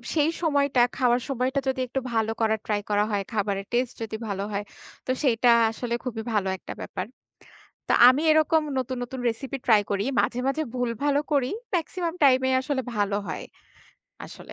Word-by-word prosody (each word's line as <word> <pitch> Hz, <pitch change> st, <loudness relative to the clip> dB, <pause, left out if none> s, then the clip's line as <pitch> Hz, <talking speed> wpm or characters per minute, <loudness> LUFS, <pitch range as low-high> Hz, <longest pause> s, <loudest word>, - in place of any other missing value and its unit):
সেই 300 Hz, +1 st, +3 dB
সময়টা 285 Hz, -5 st, +2 dB, 0.2 s
খাওয়ার 245 Hz, -1 st, +2 dB
সময়টা 260 Hz, +1 st, 0 dB
যদি 260 Hz, 0 st, 0 dB
একটু 265 Hz, +2 st, -2 dB
ভালো 225 Hz, 0 st, +1 dB
করার 220 Hz, -1 st, +2 dB
ট্রাই 205 Hz, -1 st, 0 dB
করা 205 Hz, 0 st, +3 dB
হয় 200 Hz, -1 st, 0 dB
খাবারের 200 Hz, -1 st, -1 dB
টেস্ট 245 Hz, 0 st, 0 dB
যদি 220 Hz, -1 st, -4 dB
ভালো 200 Hz, -1 st, -3 dB
হয়। 200 Hz, 0 st, -2 dB, 0.4 s
তো 255 Hz, -, -1 dB
সেইটা 245 Hz, -2 st, +3 dB, 0.2 s
আসলে 235 Hz, +1 st, -4 dB
খুবই 225 Hz, -3 st, -4 dB
ভালো 195 Hz, -2 st, +1 dB
একটা -, -, -8 dB
ব্যাপার। -, -, -5 dB, 0.8 s
তো -, -, +2 dB, 0.2 s
আমি 270 Hz, +5 st, +4 dB
এরকম 315 Hz, 0 st, +4 dB, 0.2 s
নতুন, 255 Hz, 0 st, -3 dB
নতুন 250 Hz, +1 st, -6 dB
রেসিপি 270 Hz, +4 st, -5 dB
ট্রাই 215 Hz, -3 st, +5 dB
করি। 200 Hz, 0 st, 0 dB, 0.2 s
মাঝে, 245 Hz, -, -1 dB
মাঝে 305 Hz, +4 st, 0 dB
ভুলভালও 265 Hz, +4 st, 0 dB
করি। 265 Hz, -3 st, +2 dB, 0.3 s
মেক্সিমাম 340 Hz, 0 st, -2 dB
টাইমে 260 Hz, -1 st, +5 dB
আসলে 265 Hz, -1 st, -2 dB
ভালো 205 Hz, 0 st, +1 dB
হয় -, -, -4 dB, 0.8 s
আসলে। -, -, -11 dB
250 Hz, 170 wpm, -25 LUFS, 220-275 Hz, 0.8 s, ট্রাই